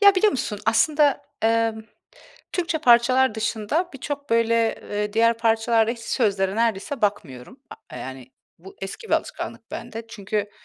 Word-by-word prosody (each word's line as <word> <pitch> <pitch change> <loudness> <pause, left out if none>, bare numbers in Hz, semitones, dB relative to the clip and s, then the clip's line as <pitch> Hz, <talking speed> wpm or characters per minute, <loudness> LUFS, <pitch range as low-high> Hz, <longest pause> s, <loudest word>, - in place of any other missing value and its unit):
Ya, 400 -1 +7
biliyor 415 +3 +4
musun, 215 -5 -3
aslında, 285 +5 +3 0.2
ımm, 225 -1 +1 0.7
Türkçe 335 -3 -1
parçalar 255 -2 +4
dışında 225 - -1
birçok, 285 0 -6
böyle, 230 0 +2 0.2
eee, 210 0 -2
diğer 230 +1 +3
parçalarda 225 0 +2
hiç 235 - -5
sözlere 200 -4 0
neredeyse 230 +3 -1
bakmıyorum, 160 -12 -3
aaa, - - -12
yani, 130 -1 -8 0.3
bu 190 +3 -14
eski 195 - -7
bir - - -4
alışkanlık - - -4
bende. 230 -1 -7
Çünkü 205 -1 -3
225 Hz, 140 wpm, -23 LUFS, 210-260 Hz, 0.7 s, Ya